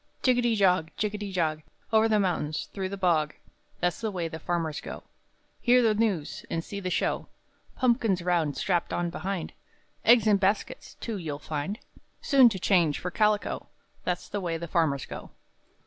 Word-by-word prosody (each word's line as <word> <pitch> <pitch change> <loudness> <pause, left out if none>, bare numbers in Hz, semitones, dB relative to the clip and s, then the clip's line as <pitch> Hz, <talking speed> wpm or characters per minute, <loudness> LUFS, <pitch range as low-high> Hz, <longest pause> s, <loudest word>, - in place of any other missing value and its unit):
[Roughly] 255 - +5
Jiggety 240 -2 +2
jog, 180 -5 +3
jiggety 210 -1 -2
jog, 160 -4 0 0.3
Over 220 0 +5
the 215 -1 +3
mountain, 175 -6 0
through 190 +4 -4
the 200 - -5
bog 160 -5 +1 0.5
That's 175 +3 0
the 220 - -1
way 180 -4 -2
the 160 0 -7
farmers 165 -2 -2
go, - - -8 0.6
Hear 250 0 +5
the 220 -2 +4
news 205 -8 -1
and 165 - -2
see 200 - -6
the 185 -2 -3
show; - - 0 0.5
Pumpkins 230 -8 +2
round 170 -5 +1
strapped 175 -3 0
on 175 -1 -1
behind, 190 -1 -4 0.5
Eggs 235 -2 +6
in 210 -2 +5
baskets, 200 - -1
too, 225 -3 -5
you'll 155 -6 -4
find, 150 +7 -4 0.4
Soon 265 -4 +6
to 205 - -4
change 175 -5 +3
for 180 - -4
calico 210 +1 +1 0.4
That's 180 -1 -2
the 205 - -3
way 170 -2 -2
the 170 +1 -6
farmers 155 -5 +1
go. - - -8
185 Hz, 175 wpm, -28 LUFS, 165-210 Hz, 0.6 s, Eggs